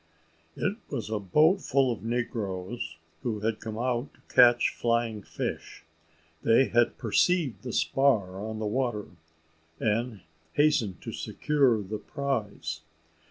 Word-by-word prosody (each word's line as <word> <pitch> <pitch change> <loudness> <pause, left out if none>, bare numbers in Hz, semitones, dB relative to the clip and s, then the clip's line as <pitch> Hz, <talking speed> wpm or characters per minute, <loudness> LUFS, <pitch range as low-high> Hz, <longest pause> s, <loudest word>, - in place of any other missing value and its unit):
It - - -1
was - - -4
a 110 - 0
boat 155 - +4
full 135 -1 +2
of 115 - -4
negroes, 110 -6 -3 0.2
who 110 -5 -2
had 110 0 -1
come 110 -1 -6
out 125 +2 -1
to - - -22
catch 120 -1 +7
flying 115 -2 0
fish. - - -5 0.6
They 115 +4 +4
had 120 0 +2
perceived 140 - +1
the 125 - -5
spar 110 -9 +2
on 110 0 -4
the 110 - -3
water, 120 -1 -1 0.7
and 110 -1 -1 0.3
hastened 140 - +2
to - - -5
secure 135 -8 +1
the 105 +2 -5
prize. 110 - -3
115 Hz, 130 wpm, -28 LUFS, 105-130 Hz, 0.7 s, catch